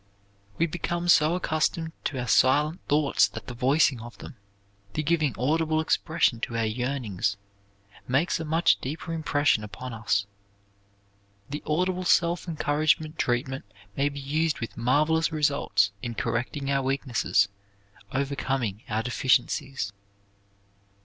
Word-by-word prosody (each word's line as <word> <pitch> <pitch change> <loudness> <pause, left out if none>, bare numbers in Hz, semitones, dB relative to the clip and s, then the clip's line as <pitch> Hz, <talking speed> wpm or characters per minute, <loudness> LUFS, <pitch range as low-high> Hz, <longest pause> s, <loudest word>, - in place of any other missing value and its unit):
We 165 - +3
become 175 +1 -3
so 155 0 +5
accustomed 160 -1 0
to 140 - -2
our 125 - -3
silent 150 - +3
thoughts 145 -1 +3
that - - -9
the 125 - -7
voicing 130 0 +2
of 120 +1 -10
them, 145 - -10 0.6
the 155 - -1
giving 155 -5 +1
audible 155 +5 +1
expression 160 -5 +1
to 115 0 -3
our 115 - +1
yearnings, 110 -4 -2 0.7
makes 145 +8 +1
a - - -3
much 165 +2 +3
deeper 155 +5 -5
impression 145 -7 +1
upon 125 +4 -7
us. 105 -3 0 1.3
The 150 - -4
audible 180 +4 0
self 175 0 +2
encouragement 155 0 0
treatment 130 +2 -1 0.3
may 140 +1 +1
be 140 0 -7
used 150 +3 0
with 115 - -5
marvelous 155 +7 +2
results 140 -10 +2
in 120 +1 -4
correcting 135 +6 -2
our 135 0 +2
weaknesses; 130 -6 +1 0.6
overcoming 135 -6 -2
our 110 +1 0
deficiencies. 125 -2 0
140 Hz, 130 wpm, -26 LUFS, 120-155 Hz, 1.3 s, so